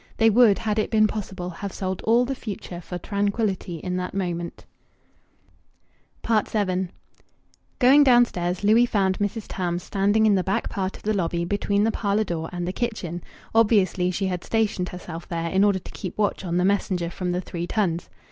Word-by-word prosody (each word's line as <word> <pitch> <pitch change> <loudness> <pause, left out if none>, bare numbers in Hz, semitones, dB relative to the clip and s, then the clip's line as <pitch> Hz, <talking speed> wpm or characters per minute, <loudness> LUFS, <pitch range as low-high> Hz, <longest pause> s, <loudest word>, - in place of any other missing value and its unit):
They 225 0 +5
would, 220 -2 +6
had 215 -1 -1
it 215 - 0
been 215 -1 +4
possible, 190 -4 -4
have 195 +3 -6
sold 185 0 -3
all 235 +3 +4
the 270 - -2
future 200 -7 -7
for 180 +1 -6
tranquillity 200 -1 -1
in 180 +3 -3
that 180 +1 -4
moment. 175 -3 -3 1.6
VII 205 -4 +1 0.9
Going 275 +3 +6
downstairs, 205 -9 +3
Louis 225 +4 +5
found 190 -4 +1
Mrs. 205 +2 -2
Tarns 175 -1 -2
standing 205 +2 +2
in 215 - +5
the 190 -2 +2
back 195 +1 -1
part 190 -1 -3
of - - -20
the 215 - +1
lobby 170 -3 -1
between 205 +2 0
the 225 - +2
parlour 205 0 0
door 165 -5 -4
and 175 -1 -4
the 185 - -2
kitchen; 195 -8 -3 0.3
obviously 205 -5 +3
she 190 +2 -1
had 180 -2 -2
stationed 215 -5 0
herself 175 -2 -8
there 165 -1 -2
in 190 +1 +3
order 205 -2 +3
to 185 - -10
keep 185 - -7
watch 205 -2 0
on 175 -2 -1
the 180 - +2
messenger 185 -3 0
from 180 0 -3
the 180 - 0
"Three 175 -1 -5
Tuns." 175 -6 -1
195 Hz, 185 wpm, -24 LUFS, 180-215 Hz, 1.6 s, would